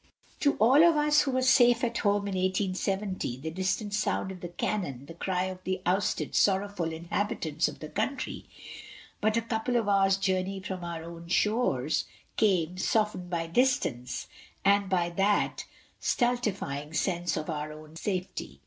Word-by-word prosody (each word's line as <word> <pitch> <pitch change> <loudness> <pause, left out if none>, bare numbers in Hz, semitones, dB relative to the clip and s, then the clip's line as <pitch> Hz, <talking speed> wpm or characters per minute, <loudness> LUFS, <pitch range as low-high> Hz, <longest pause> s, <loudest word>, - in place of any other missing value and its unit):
To 285 - +3
all 260 +8 +6
of 340 -2 +6
us 300 0 +4
who 285 - -1
were 260 0 +1
safe 245 -2 +5
at 235 -1 0
home 205 -1 +1
in 200 - -3
1870, 190 - -1
the 160 +4 -5
distant 190 +4 -1
sound 205 -2 0
of 185 - -8
the 175 - -4
cannon, 175 -6 -3
the 165 - -10
cry 180 +1 -1
of 185 -1 -5
the 185 0 -2
ousted, 185 +4 0
sorrowful 195 -3 +1
inhabitants 165 -1 -1
of - - -8
the 155 - -5
country 220 - -3 0.8
but 215 +1 +2
a 230 - +1
couple 230 +2 -1
of 230 -3 +1
hours' 195 -1 +4
journey 190 0 0
from 185 -1 -5
our 170 -1 -5
own 170 0 -9
shores 170 - +1 0.3
came, 180 -4 +2
softened 210 -4 0
by 170 -2 -1
distance, 165 - 0 0.4
and 200 0 +4
by 175 -2 +1
that 195 +4 +1 0.3
stultifying 200 - -1
sense 175 -2 0
of 155 - -3
our 155 -1 -3
own 155 +1 -12
safety. 185 +1 -4
190 Hz, 160 wpm, -29 LUFS, 170-215 Hz, 0.8 s, all